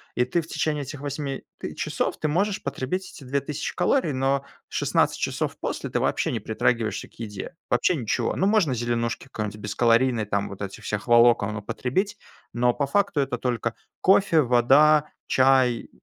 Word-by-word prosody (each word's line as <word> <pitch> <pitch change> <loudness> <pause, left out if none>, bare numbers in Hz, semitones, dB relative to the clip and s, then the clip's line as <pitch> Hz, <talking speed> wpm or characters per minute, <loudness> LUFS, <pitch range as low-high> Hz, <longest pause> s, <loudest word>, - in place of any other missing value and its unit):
и 125 - +3
ты 170 +7 0
в 160 - -12
течение 150 -3 -1
этих 140 +1 -8
8 140 -1 -4
т - - -6
часов - - -2
ты 155 - 0
можешь 195 +6 0
потребить 140 +7 -3
эти - - -12
2000 140 +3 -3
калорий, 180 - +1
но 135 +1 0 0.2
16 - - +1
часов - - -2
после - - -4
ты - - 0
вообще - - 0
не - - -2
притрагиваешься 115 -3 -1
к - - -29
еде, 110 - -7
вообще 180 - +2
ничего. 120 -8 -1
Ну, 190 - +1
можно 195 -10 +3
зеленушки 115 0 -2
какой-нибудь 105 -5 -5
бескалорийной, 115 +2 +2
там, 100 -1 -1
вот 100 0 -9
этих 100 -1 -6
всех 105 +2 -3
волокон 115 -3 +5
употребить, 125 - -2 0.4
но 120 0 +2
по 140 - 0
факту 180 0 +1
это 125 -3 -2
только 120 -2 -1 0.3
кофе, 185 -4 +4
вода, 140 +5 +4 0.2
чай, 130 -2 +3
130 Hz, 170 wpm, -25 LUFS, 115-150 Hz, 0.4 s, волокон